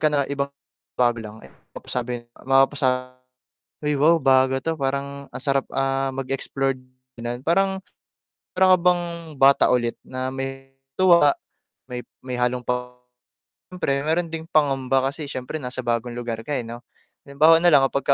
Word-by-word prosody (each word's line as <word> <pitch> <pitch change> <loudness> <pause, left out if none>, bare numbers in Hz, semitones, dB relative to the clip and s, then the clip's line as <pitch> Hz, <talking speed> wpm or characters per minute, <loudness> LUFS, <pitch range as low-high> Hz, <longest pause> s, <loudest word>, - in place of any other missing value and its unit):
ka 155 - +4
na 145 -2 +1
iba, 140 0 -1 0.5
bago 120 -2 +2
lang. 110 -1 -9
Eh - - -15 0.2
mapasabi, 120 -1 -4 0.2
mapapasa 130 -1 +2 0.7
ay 150 0 0
wow, 155 +4 +4
bago 130 -2 +3
'to, 160 +5 -2
parang 140 -1 -4
ang - - -7
sarap, 135 -1 +1
ah, 135 0 0
mag-explore, 135 0 -2 0.4
gano'n 120 +1 -5
Parang, 190 +3 +2 0.8
para 190 0 +4
ka - - +5
bang 170 -2 0
bata 135 +1 +5
ulit, 120 -1 -1
na 130 0 -4
may 135 0 -6 0.2
tuwa, 170 -5 +5 0.5
may 125 -1 -6 0.2
may 130 -1 -6
halong 125 0 0
pa 125 0 -2 0.8
siyempre 140 -6 -1
meron 165 +2 0
ding 160 0 -6
pangamba 135 -4 +1
kasi 150 +2 -7
siyempre 130 +1 -5
nasa 130 -3 -6
bagong 120 0 -2
lugar 120 -2 -4
ka 150 - -3
'no. 120 +1 -9 0.4
Halimbawa 155 +4 +5
nalang 155 -6 +5
kapag 140 -1 -2
135 Hz, 150 wpm, -23 LUFS, 125-150 Hz, 0.8 s, ka